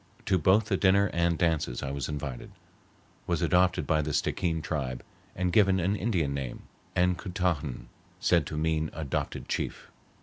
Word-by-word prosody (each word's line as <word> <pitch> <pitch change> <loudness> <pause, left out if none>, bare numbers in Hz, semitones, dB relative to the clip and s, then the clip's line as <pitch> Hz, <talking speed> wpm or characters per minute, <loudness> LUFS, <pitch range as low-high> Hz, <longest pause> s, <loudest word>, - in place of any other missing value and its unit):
To 95 - +2
both 95 +7 +4
the 100 -3 0
dinner 100 +1 +4
and 85 -1 +2
dances 80 -8 0
I 70 - -3
was 70 0 -3
invited, 70 -4 -5 0.8
was - - 0
adopted 90 +1 +3
by 80 -2 +2
the 75 0 -3
Stickeen 80 +3 0
tribe, 65 -6 -3 0.3
and 90 -1 -1
given 95 -2 +5
an 95 +4 +1
Indian 90 -9 0
name 65 -3 -5 0.3
(Ancoutahan) 90 - 0 0.3
said 85 -4 +3
to 75 - -5
mean 80 0 0
adopted 80 -4 -3
chief. - - -4
85 Hz, 155 wpm, -28 LUFS, 75-90 Hz, 0.8 s, given